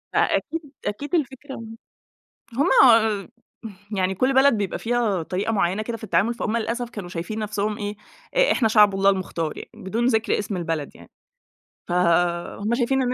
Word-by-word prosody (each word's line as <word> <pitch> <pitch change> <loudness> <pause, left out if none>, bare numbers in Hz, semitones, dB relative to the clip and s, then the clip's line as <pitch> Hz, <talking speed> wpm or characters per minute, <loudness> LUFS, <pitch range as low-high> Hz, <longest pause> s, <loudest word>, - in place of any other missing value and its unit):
أ - - +2 0.2
أكيد 330 - -5 0.2
أكيد 285 +10 -2
الفكرة 270 -2 -3 1.0
هُم 285 +8 +2 0.2
آآ، 220 -3 +3 0.7
يعني 190 0 +1
كل 255 +7 +1
بلد 265 0 +5
بيبقى 205 -3 -2
فيها 225 -6 0
طريقة 190 +6 -2
معيَّنة 195 0 +1
كده 230 +1 -4
في 220 - -10
التعامل، 200 +4 +1
فهُم 230 -1 -2
للأسف 235 +2 -2
كانوا 205 -6 -7
شايفين 175 +5 -5
نفسهم 210 0 -2
إيه، 205 0 -4 0.4
إ - - +5
إحنا 225 - +2
شعب 210 -2 +5
الله 195 +1 +4
المختار، 170 -5 -3
يعني - - -9
بدون 225 +6 -2
ذِكر 225 -3 +2
اسم 205 -1 -3
البلد 165 -4 -3
يعني. - - -16 0.8
فهُم 175 +4 +1
شايفين 265 +2 +1
215 Hz, 160 wpm, -23 LUFS, 190-240 Hz, 1.0 s, بلد